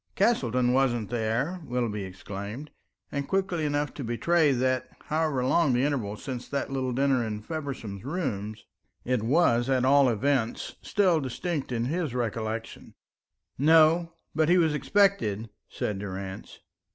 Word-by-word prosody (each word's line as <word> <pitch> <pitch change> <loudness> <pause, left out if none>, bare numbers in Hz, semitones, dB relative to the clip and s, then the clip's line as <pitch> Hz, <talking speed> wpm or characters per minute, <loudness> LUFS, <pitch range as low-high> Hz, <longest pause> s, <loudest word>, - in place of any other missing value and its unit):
"Castleton 125 - +2
wasn't 120 -4 +1
there," 120 +10 -1
Willoughby 120 -6 -2
exclaimed, 100 +9 -7 0.4
and 140 -1 -3
quickly 190 -4 0
enough 145 0 -1
to 140 - -6
betray 150 +7 +2
that, 130 0 0 0.2
however 155 -5 +1
long 150 0 +3
the 125 +1 +2
interval 120 -8 -1
since 125 -1 -6
that 140 -1 -2
little 130 -1 -1
dinner 135 -1 +2
in 105 -2 -3
Feversham's 130 - -6
rooms, 110 - -4 0.4
it 125 -2 +1
was 120 -1 +3
at 130 -1 +2
all 140 0 +5
events 120 +1 0
still 185 -5 +2
distinct 140 +3 -3
in 120 -1 -1
his 155 -2 -2
recollections. 115 -1 -4 0.6
"No, 160 +3 +5 0.2
but 155 +1 +2
he 180 - +5
was 160 -3 +3
expected," 150 - +1 0.2
said 105 -2 -3
Durrance. 95 -1 -7
130 Hz, 140 wpm, -27 LUFS, 115-155 Hz, 0.6 s, all